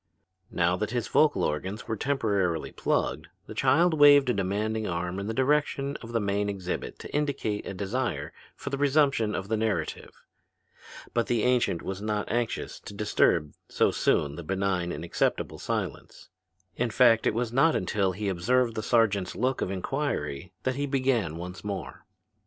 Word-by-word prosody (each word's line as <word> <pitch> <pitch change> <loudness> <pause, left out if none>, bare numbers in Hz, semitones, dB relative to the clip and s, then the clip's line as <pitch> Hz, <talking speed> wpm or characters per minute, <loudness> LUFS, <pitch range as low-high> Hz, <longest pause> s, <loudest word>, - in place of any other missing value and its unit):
Now 85 +1 +1
that 105 +1 -2
his 120 -1 -2
vocal 155 -1 +3
organs 95 +8 -3
were 110 - -1
temporarily 100 - 0
plugged, - - -1 0.2
the - - -8
child 170 +3 +3
waved 145 -3 +7
a - - 0
demanding 105 +3 -1
arm 90 +2 -2
in 100 - -4
the - - -1
direction 140 +2 +1
of 115 - -10
the 115 - +1
main 100 0 0
exhibit 95 -3 -4
to - - -8
indicate 140 -8 -1
a 95 - -5
desire 105 +5 -2 0.2
for - - -6
the 140 - -2
resumption 140 -6 +2
of 95 - -4
the 110 +1 0
narrative. 110 -1 -3 0.9
But 120 -1 +1
the 120 -3 +1
ancient 125 -9 +2
was 95 +1 -4
not 105 -1 -2
anxious 120 -1 -2
to 100 - -10
disturb 90 -7 +2 0.2
so - - +2
soon 70 0 +1
the 85 - -6
benign 95 0 -1
and 85 - -5
acceptable 85 - -1
silence. - - -4 0.5
In 120 0 0
fact 115 0 +4
it - - +1
was 120 0 -1
not 140 +5 +4
until 95 0 0
he 105 +2 -4
observed 115 +7 +1
the 110 - -3
sergeant's 105 -5 +2
look 130 +2 0
of - - -1
inquiry 95 - -3
that 130 0 -1
he 145 0 -1
began 130 - 0
once 90 +2 -7
more. 100 -3 -6
110 Hz, 170 wpm, -27 LUFS, 95-125 Hz, 0.9 s, waved